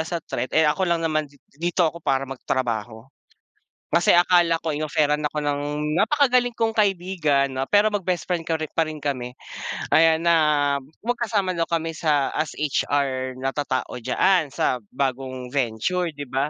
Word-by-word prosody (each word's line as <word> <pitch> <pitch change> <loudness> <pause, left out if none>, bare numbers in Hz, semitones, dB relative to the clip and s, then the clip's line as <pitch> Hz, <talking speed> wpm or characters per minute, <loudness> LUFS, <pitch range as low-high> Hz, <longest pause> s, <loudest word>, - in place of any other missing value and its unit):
as 160 - -4
a - - 0
threat 125 +2 -3
eh 160 0 +5
ako 150 +6 +1
lang 170 -1 +2
naman 155 -1 0
di 145 - -22 0.2
dito 170 +3 +1
ako 170 +1 -5
para 135 -2 0
mag-trabaho. 120 -4 -3 0.9
Kasi 170 +2 +4
akala 175 -1 +4
ko 160 - 0
in-offeran 150 0 0
ako 155 - -13
ng 145 -1 0 0.4
napakagaling 250 +1 +3
kong 225 -1 +1
kaibigan 175 -9 +1
'no 135 - 0
pero 205 +1 +4
mag-bestfriend 180 -3 -2
korin 160 -2 -2
parin 155 -2 -1
kami. 125 -4 -3 0.6
Ayan 160 0 +5
na 170 0 +4 0.7
magkasama 225 -6 0
daw 165 - +1
kami 165 -1 -1
sa 150 -4 +1
as 155 - -2
HR 135 -3 -1
na 135 - 0
tatao 135 -4 -2
diya-an 155 +7 +2
sa 125 - +1 0.2
bagong 130 -2 -3
venture 140 +8 0
'di 145 0 -6
ba? 135 +3 0
155 Hz, 155 wpm, -23 LUFS, 135-175 Hz, 0.9 s, eh